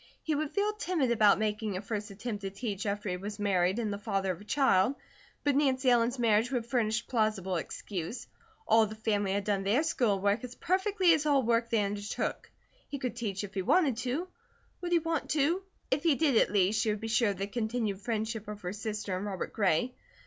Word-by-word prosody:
He 315 Hz, -, 0 dB
would 300 Hz, 0 st, -1 dB
feel 415 Hz, +4 st, 0 dB
timid 345 Hz, -, 0 dB
about 215 Hz, -3 st, +5 dB
making 210 Hz, -2 st, -1 dB
a -, -, -4 dB
first 210 Hz, 0 st, -4 dB
attempt 205 Hz, +1 st, -5 dB
to 195 Hz, -, -3 dB
teach 200 Hz, 0 st, -4 dB
after 205 Hz, +1 st, -2 dB
he 180 Hz, -1 st, -1 dB
was 205 Hz, +3 st, -6 dB
married 190 Hz, -2 st, +1 dB
and 220 Hz, -3 st, -1 dB
a 200 Hz, -, -5 dB
father 195 Hz, -3 st, -1 dB
of 180 Hz, -, -7 dB
a -, -, -12 dB
child, 260 Hz, -3 st, +3 dB, 0.5 s
but 285 Hz, -2 st, +2 dB
Nancy 265 Hz, -2 st, +3 dB
Ellen's 240 Hz, +1 st, +3 dB
marriage 230 Hz, -1 st, +3 dB
would 245 Hz, -3 st, -1 dB
furnish 230 Hz, -2 st, 0 dB
plausible 215 Hz, -6 st, 0 dB
excuse; 180 Hz, +5 st, -5 dB, 0.4 s
all 225 Hz, -, +6 dB
of 215 Hz, -, +2 dB
the 215 Hz, -, -7 dB
family 205 Hz, -3 st, 0 dB
had 200 Hz, 0 st, 0 dB
done 200 Hz, -1 st, 0 dB
their 210 Hz, +10 st, +2 dB
school 235 Hz, -10 st, +1 dB
work 205 Hz, +4 st, +1 dB
as 250 Hz, -1 st, -7 dB
perfectly 375 Hz, -1 st, +2 dB
as 305 Hz, -1 st, +1 dB
all 280 Hz, -3 st, +4 dB
work 230 Hz, 0 st, +1 dB
they 225 Hz, -3 st, +2 dB
undertook; 205 Hz, +1 st, -3 dB, 0.4 s
he 285 Hz, -, -4 dB
could 250 Hz, -4 st, -3 dB
teach 205 Hz, -4 st, -3 dB
if 205 Hz, 0 st, -7 dB
he 190 Hz, -, -1 dB
wanted 275 Hz, -, +3 dB
to; 260 Hz, +8 st, -2 dB, 0.5 s
would 350 Hz, -1 st, -4 dB
he 345 Hz, -, +5 dB
want 330 Hz, -1 st, -2 dB
to? 315 Hz, +5 st, +2 dB, 0.3 s
If 270 Hz, +2 st, +2 dB
he 325 Hz, -3 st, +3 dB
did, 290 Hz, -3 st, +2 dB
at -, -, +4 dB
least, 205 Hz, +2 st, +3 dB
she 225 Hz, -, +1 dB
would 210 Hz, 0 st, -1 dB
be 225 Hz, -, -5 dB
sure 230 Hz, 0 st, +2 dB
of 200 Hz, -, -3 dB
the 195 Hz, -, -2 dB
continued 220 Hz, -2 st, -2 dB
friendship 220 Hz, -1 st, -3 dB
of 210 Hz, -1 st, -7 dB
her 180 Hz, +1 st, -4 dB
sister 210 Hz, -2 st, -3 dB
and 190 Hz, +3 st, -3 dB
Robert 190 Hz, -3 st, -4 dB
Gray. 200 Hz, +4 st, +1 dB
220 Hz, 220 wpm, -30 LUFS, 200-255 Hz, 0.5 s, all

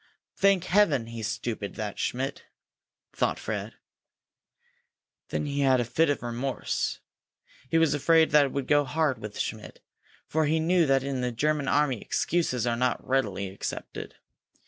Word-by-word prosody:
"Thank 195 Hz, -3 st, +3 dB
heaven 180 Hz, -, +3 dB
he's 115 Hz, -2 st, -5 dB
stupid, 115 Hz, -3 st, -4 dB
that 105 Hz, -2 st, -5 dB
Schmidt!" 135 Hz, +3 st, -2 dB, 0.7 s
thought -, -, 0 dB
Fred. -, -, -5 dB, 1.5 s
Then -, -, -2 dB
he 145 Hz, -1 st, -2 dB
had 135 Hz, -2 st, +4 dB
a 120 Hz, -, 0 dB
fit 160 Hz, +7 st, +2 dB
of 145 Hz, -, -1 dB
remorse. 120 Hz, +3 st, -2 dB, 0.7 s
He 165 Hz, -, +2 dB
was 165 Hz, -2 st, +4 dB
afraid 160 Hz, +2 st, +4 dB
that 150 Hz, -1 st, +6 dB
it 135 Hz, -, -4 dB
would 140 Hz, -2 st, -2 dB
go 145 Hz, 0 st, +4 dB
hard 145 Hz, 0 st, 0 dB
with 105 Hz, -1 st, -7 dB
Schmidt, 110 Hz, -1 st, -5 dB, 0.5 s
for 155 Hz, -1 st, 0 dB
he 160 Hz, +2 st, +2 dB
knew 170 Hz, 0 st, +3 dB
that 135 Hz, -1 st, +3 dB
in 135 Hz, -2 st, -2 dB
the 125 Hz, 0 st, -1 dB
German 145 Hz, +4 st, 0 dB
army 145 Hz, -6 st, +2 dB
excuses 130 Hz, -9 st, 0 dB
are 120 Hz, -1 st, +1 dB
not 125 Hz, +1 st, -1 dB
readily 100 Hz, -8 st, 0 dB
accepted. 95 Hz, -, -6 dB
135 Hz, 155 wpm, -27 LUFS, 120-155 Hz, 1.5 s, that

